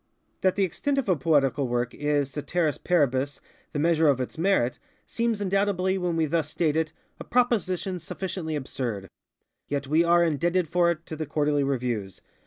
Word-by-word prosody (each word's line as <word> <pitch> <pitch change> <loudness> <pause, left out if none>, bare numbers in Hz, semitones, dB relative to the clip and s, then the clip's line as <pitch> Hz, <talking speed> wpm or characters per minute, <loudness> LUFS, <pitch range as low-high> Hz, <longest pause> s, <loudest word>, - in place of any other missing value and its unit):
That 185 -1 +2
the 200 - +2
extent 275 - -1
of 275 - 0
a 185 - +3
poetical 140 -2 +2
work 120 0 -1
is, 145 -2 0
_ceteris 155 +2 -1
paribus, 140 -5 +1 0.3
_the 145 - -3
measure 160 0 +3
of 140 -3 +3
its 125 - -4
merit, 160 -9 +1 0.3
seems 230 -2 -1
undoubtedly, 195 -1 +1
when 175 -2 -1
we 165 -1 +2
thus 155 0 0
state 155 -1 0
it, 160 -1 0 0.3
a - - -6
proposition 190 -7 0
sufficiently 170 -1 -4
absurdŌĆöyet 130 +2 -6
we 155 +4 +3
are 170 0 +4
indebted 170 +2 +1
for 175 +2 +3
it 170 -1 -2
to 160 - -6
the 155 -1 -4
Quarterly 145 0 +1
Reviews. 120 -8 -2
160 Hz, 170 wpm, -26 LUFS, 140-180 Hz, 0.3 s, are